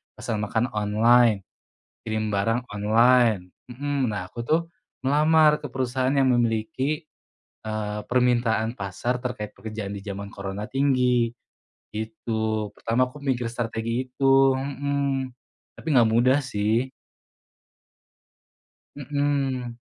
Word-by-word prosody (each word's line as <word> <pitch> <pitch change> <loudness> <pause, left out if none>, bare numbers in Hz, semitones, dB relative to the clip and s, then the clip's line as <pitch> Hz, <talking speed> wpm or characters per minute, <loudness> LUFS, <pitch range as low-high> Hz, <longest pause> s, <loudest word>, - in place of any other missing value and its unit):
pesan 110 -3 -3
makan 115 +4 -1
online, 110 0 +3 0.6
kirim 110 -1 -1
barang 115 +5 0
online. 110 -2 +3 0.2
Mhm. 140 0 -1
Nah, 90 -3 -4
aku, 120 - -9
tuh, 160 +2 +3 0.4
melamar 150 +2 +4
ke 145 - -6
perusahaan 130 0 -1
yang 135 -2 +4
memiliki, 120 +6 0 0.6
eee, 105 -1 -3
permintaan 120 -2 +2
pasar 120 +5 -3
terkait 105 -4 -5
pekerjaan 105 -1 -6
di 100 - -7
jaman 100 0 -6
Corona 100 +2 -5
tinggi, 125 -3 +2 0.6
gitu. 110 0 -3
Pertama, 125 +3 +1
aku 150 - -13
mikir 125 -3 0
strategi 115 +1 -2
itu, 135 0 +4
mhm, 140 -1 -2 0.4
tapi - - -13
enggak 120 -6 +5
mudah, 130 +4 +4
sih. 115 +2 0 2.0
Mhm. 140 -4 -1
120 Hz, 110 wpm, -25 LUFS, 110-130 Hz, 2.0 s, enggak